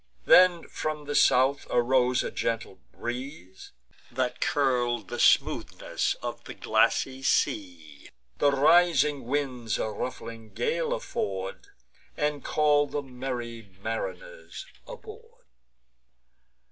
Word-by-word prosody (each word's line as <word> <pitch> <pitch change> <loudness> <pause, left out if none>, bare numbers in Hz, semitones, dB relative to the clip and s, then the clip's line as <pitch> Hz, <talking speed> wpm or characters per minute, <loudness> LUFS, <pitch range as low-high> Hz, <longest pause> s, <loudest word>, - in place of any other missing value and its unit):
Then 180 -2 +6
from 155 -1 -4
the 145 - -4
south 135 +1 +3
arose 125 +1 +2
a - - -4
gentle 115 -4 -3
breeze 120 - -7 0.4
That 125 0 -2
curl'd 120 -6 0
the - - -5
smoothness - - +1
of - - -5
the - - -8
glassy 135 0 +1
seas; 85 - -2 0.3
The 145 - +4
rising 145 -2 +3
winds 125 -4 -2
a 110 - -2
ruffling 115 -1 -7
gale 485 +1 -1
afford, 95 - -4 0.5
And 150 -1 -1
call 145 -1 +2
the 145 0 -4
merry 125 -3 -6 0.2
mariners - - -6 0.2
aboard. 470 0 -12
130 Hz, 105 wpm, -27 LUFS, 120-150 Hz, 0.5 s, Then